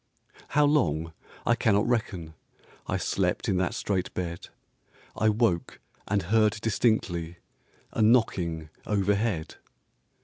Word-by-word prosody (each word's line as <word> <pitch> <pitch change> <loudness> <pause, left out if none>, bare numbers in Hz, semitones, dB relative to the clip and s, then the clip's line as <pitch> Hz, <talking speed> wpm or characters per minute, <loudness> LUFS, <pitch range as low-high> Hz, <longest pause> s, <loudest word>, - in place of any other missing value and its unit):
How 150 - +6
long 85 - +1 0.3
I 120 - +4
cannot 105 -2 +2
reckon, 100 -9 -1 0.5
I - - 0
slept - - -1
in 95 - +1
that 90 -1 0
strait 95 -3 -1
bed; 85 -1 -4 0.7
I 110 - +3
woke 105 -6 0 0.3
and 100 -1 +1
heard 110 +3 +2
distinctly 100 -7 0 0.5
A - - -1
knocking 90 -9 +2 0.2
overhead. 100 -3 0
100 Hz, 110 wpm, -27 LUFS, 85-110 Hz, 0.7 s, How